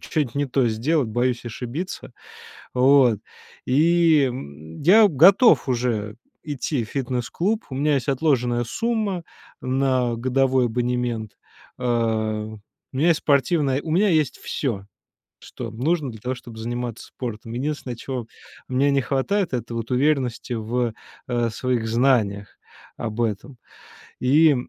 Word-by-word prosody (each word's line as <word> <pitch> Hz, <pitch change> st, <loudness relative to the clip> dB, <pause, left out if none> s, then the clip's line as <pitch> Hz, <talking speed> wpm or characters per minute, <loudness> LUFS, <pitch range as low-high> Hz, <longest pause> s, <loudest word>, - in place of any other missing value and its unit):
ч -, -, -12 dB
чё-нить 145 Hz, -7 st, -1 dB
не 145 Hz, 0 st, +1 dB
то 130 Hz, -1 st, +1 dB
сделать, 125 Hz, +5 st, 0 dB
боюсь 120 Hz, +2 st, 0 dB
ошибиться, 125 Hz, -, -6 dB, 0.6 s
вот, 125 Hz, -4 st, +5 dB, 0.5 s
и, 160 Hz, +2 st, +4 dB
м. 80 Hz, -, -9 dB
Я 210 Hz, +8 st, +7 dB
готов 175 Hz, -, +6 dB
уже 120 Hz, -4 st, -1 dB, 0.3 s
идти 145 Hz, -2 st, -2 dB
в 110 Hz, -, -13 dB
фитнес-клуб. 135 Hz, -, -2 dB
У 130 Hz, -, -5 dB
меня 150 Hz, +2 st, +2 dB
есть 135 Hz, -2 st, -2 dB
отложенная 125 Hz, -4 st, +1 dB
сумма 215 Hz, -, -1 dB, 0.4 s
на 130 Hz, -2 st, +1 dB
годовой 130 Hz, +1 st, +2 dB
абонемент, 120 Hz, -2 st, -2 dB, 0.5 s
э. 125 Hz, -, -6 dB, 1.1 s
У -, -, -7 dB
меня 150 Hz, +5 st, +2 dB
есть 165 Hz, -2 st, +3 dB
спортивная, 140 Hz, -1 st, +2 dB
у 160 Hz, -, -6 dB
меня 205 Hz, +5 st, +3 dB
есть 155 Hz, -5 st, +1 dB
всё, 105 Hz, -9 st, -3 dB, 0.5 s
что 120 Hz, -, -8 dB
нужно 140 Hz, +4 st, -1 dB
для 110 Hz, -2 st, -12 dB
того, 125 Hz, +2 st, -2 dB
чтобы 120 Hz, -2 st, -12 dB
заниматься 120 Hz, 0 st, -4 dB
спортом. 115 Hz, -3 st, -7 dB
Единственное, 130 Hz, -1 st, -3 dB
чего 125 Hz, -2 st, -5 dB, 0.4 s
мне 130 Hz, +2 st, +2 dB
не 140 Hz, 0 st, +2 dB
хватает- 170 Hz, +10 st, 0 dB
это 120 Hz, -1 st, -3 dB
вот 115 Hz, +1 st, -4 dB
уверенности 130 Hz, -3 st, 0 dB
в, 120 Hz, +1 st, -1 dB, 0.4 s
э, 120 Hz, -1 st, +1 dB
своих 120 Hz, 0 st, -1 dB
знаниях 110 Hz, -5 st, +1 dB, 0.4 s
об 110 Hz, -1 st, -5 dB
этом. 115 Hz, +4 st, -3 dB, 0.6 s
И, 150 Hz, +4 st, +5 dB
130 Hz, 135 wpm, -23 LUFS, 120-145 Hz, 1.1 s, Я